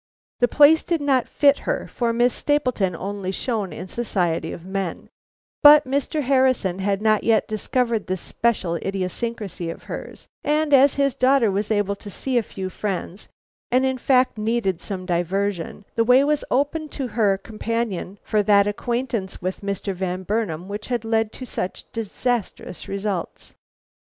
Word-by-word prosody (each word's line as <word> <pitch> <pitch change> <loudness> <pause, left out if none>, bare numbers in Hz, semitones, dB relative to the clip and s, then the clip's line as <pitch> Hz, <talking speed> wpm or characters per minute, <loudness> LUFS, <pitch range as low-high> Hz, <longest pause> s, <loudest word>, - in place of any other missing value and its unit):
"The 245 - +4
place 300 +4 +6
did 340 -2 -1
not 270 -4 +1
fit 280 -1 +3
her, - - -2
for 235 -1 -1
Miss 240 +1 +2
Stapleton 255 - 0
only 195 +1 -4
shone 210 -2 -2
in - - -7
the 185 - -11
society 180 -8 -1
of 170 - -9
men; 190 -2 -4 0.5
but 295 0 +9
Mr. 280 +3 -1
Harrison 255 -8 +2
had 200 +1 -1
not 215 -1 +3
yet 225 -1 +3
discovered 230 +1 -1
this 185 0 -2
special 195 -7 0
idiosyncrasy 195 -1 -3
of 165 - -8
hers, - - -8 0.2
and 300 0 +1
as 275 +1 +6
his 275 -2 +2
daughter 255 -4 +3
was 205 +2 -1
able 205 -2 +1
to 205 - -9
see 260 +6 -2
a - - 0
few 190 -3 -6
friends, 195 -1 -4 0.4
and 255 +2 +3
in 260 -1 -1
fact 255 -3 +2
needed 215 -5 0
some 185 -3 -5
diversion, 185 +2 -2
the 230 - +2
way 250 +3 +5
was 295 0 +1
open 290 +4 0
to 270 -3 -4
her 210 -3 +2
companion 215 -2 -3
for 215 - +1
that 200 -1 +4
acquaintance 230 -1 -2
with 185 +1 -4
Mr. 200 0 -3
Van 185 0 -3
Burnam 185 -5 -2
which 205 +1 -6
has 240 -3 -1
led 225 -1 0
to 255 - -7
such 185 -5 -4
disastrous 230 -3 -3
results. 195 -2 -4
215 Hz, 165 wpm, -23 LUFS, 195-255 Hz, 0.5 s, but